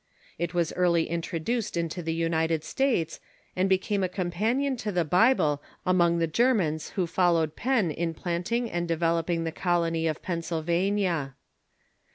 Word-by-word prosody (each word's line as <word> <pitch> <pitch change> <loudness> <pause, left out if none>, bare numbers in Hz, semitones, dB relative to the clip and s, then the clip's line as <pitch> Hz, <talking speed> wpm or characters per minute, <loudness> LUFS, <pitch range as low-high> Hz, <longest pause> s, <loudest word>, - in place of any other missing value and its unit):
It 170 0 -2
was 170 -2 +1
early 170 -2 +2
introduced 170 +6 -2
into 170 +1 -2
the 165 -1 -2
United 160 -1 0
States, 205 - 0 0.4
and 185 +1 +1
became 190 +1 +1
a 185 - 0
companion 215 +10 0
to 215 -2 -3
the 175 -3 +1
Bible 165 - +3 0.2
among 175 -2 +3
the 165 - +2
Germans 165 -4 +1
who 185 - +2
followed 165 -3 +1
Penn 235 -9 +1
in 165 +1 -2
planting 180 +9 -2
and 175 0 -2
developing 165 0 0
the 165 - -2
colony 165 -2 0
of 155 -1 -3
Pennsylvania. 170 -2 -1
170 Hz, 145 wpm, -27 LUFS, 165-190 Hz, 0.4 s, Bible